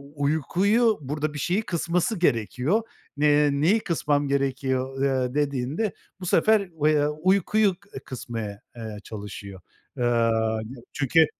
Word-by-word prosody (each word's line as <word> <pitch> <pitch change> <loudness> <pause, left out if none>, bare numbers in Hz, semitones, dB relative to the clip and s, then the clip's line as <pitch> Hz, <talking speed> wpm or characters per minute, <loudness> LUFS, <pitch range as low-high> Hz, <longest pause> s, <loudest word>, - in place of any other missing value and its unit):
uykuyu, 190 - +2
burada 150 +2 -3
bir 145 - -5
şeyi 180 +8 +1
kısması 175 +1 -1
gerekiyor. 130 - +1 0.4
Eee, 150 0 +4
"Neyi 160 +10 +3
kısmam 150 -6 0
gerekiyor?" 135 -1 -1
eee, 130 -2 +1
dediğinde 145 - -1 0.3
bu 185 - -7
sefer, 215 +6 +4 0.3
eee, 150 -1 +4
uykuyu 190 +6 +2 0.2
e, - - -5
kısmaya, 115 -6 -6
eee, 110 -3 -7
çalışıyor. 100 -2 -8 0.4
Eee, 125 - -1
yani, 115 -1 +1 0.2
çünkü 150 +3 +4
145 Hz, 120 wpm, -25 LUFS, 125-170 Hz, 0.4 s, Eee